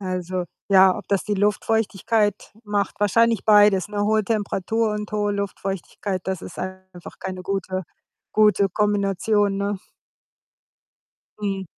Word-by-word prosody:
Also, 185 -1 -3 0.2
ja, 190 -1 +6
ob - - -8
das 200 -2 +1
die 210 - -1
Luftfeuchtigkeit 210 0 0
macht, 205 -1 -1
wahrscheinlich 230 +3 +2
beides, 205 -3 +5
ne? 205 -1 -2
Hohe 215 +1 +2
Temperatur 220 +1 -1
und 210 0 -4
hohe 205 -1 0
Luftfeuchtigkeit, 195 -1 -4
das 190 -2 -3
ist - - -9
einfach 185 -1 -8
keine 185 -1 -6
gute 190 0 -2 0.5
gute 210 -2 +4
Kombination, 205 0 +1
ne? 200 0 -2 1.6
Mhm. 195 -2 -2
200 Hz, 120 wpm, -23 LUFS, 190-210 Hz, 1.6 s, ja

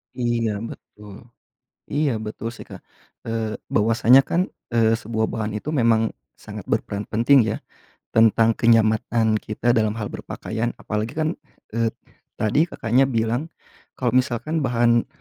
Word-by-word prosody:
Iya, 120 -2 0 0.2
betul. 105 -1 -12 0.8
Iya, 145 0 +1
betul, 110 +1 -5
sih, - - -10
Kak. - - -10 0.5
Eee, 115 -1 -2 0.2
bahwasanya, 115 +4 +5
kan, 170 - +1 0.3
eee, 115 -1 +4
sebuah 110 0 -1
bahan 110 -1 -3
itu 105 - -6
memang 115 -5 +2 0.2
sangat - - -9
berperan 100 0 -2
penting, 120 +6 +4
ya, - - -1 0.6
tentang 115 0 +5
kenyamanan 110 -1 +3
kita 110 +3 -2
dalam 110 -2 +1
hal 110 -2 -4
berpakaian. 115 +2 -4
Apalagi, 105 +2 -3
kan, 155 0 0 0.4
eee, 115 0 +1 0.4
tadi 125 +10 +2
Kakaknya 125 -3 +1
bilang 120 +3 -1 0.5
kalau 125 -2 0
misalkan 130 +5 0
bahan 120 -1 +2
115 Hz, 130 wpm, -22 LUFS, 110-120 Hz, 0.8 s, bahwasanya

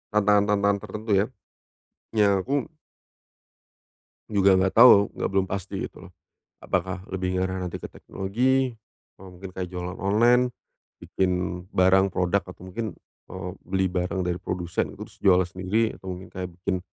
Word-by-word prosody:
tantangan-tantangan 100 -1 +3
tertentu 105 +2 -6
ya. 100 - +3 0.9
Ya 100 -2 +4
aku 140 0 -1 1.6
Juga 100 -3 +4
enggak 95 0 +1
tahu 110 -4 +8
enggak - - -2
belum 95 -1 +2
pasti 100 +1 -5
gitu - - -15
loh. - - -18 0.5
Apakah 95 0 -2
lebih 95 -1 -2
ngarah 95 0 -1
nanti 90 -1 -4
ke - - -7
teknologi, 125 +7 0 0.5
apa 95 - -12
mungkin 95 +1 -9
kayak 90 0 -4
jualan 90 +1 -6
online, 120 +5 +4 0.6
bikin 95 -1 0 0.4
barang 95 +1 +5
produk 95 +1 +1
atau 90 0 -11
mungkin, 100 0 -5 0.3
eee, 95 0 -6 0.2
beli 95 0 +1
barang 90 +1 -1
dari 90 0 -2
produsen 90 -2 -3
terus - - -11
jualan 95 -2 +5
sendiri 95 +5 -1
atau 95 - -12
mungkin 95 - -12
kayak 90 -1 -5
bikin 90 +1 -2
95 Hz, 145 wpm, -25 LUFS, 90-100 Hz, 1.6 s, tahu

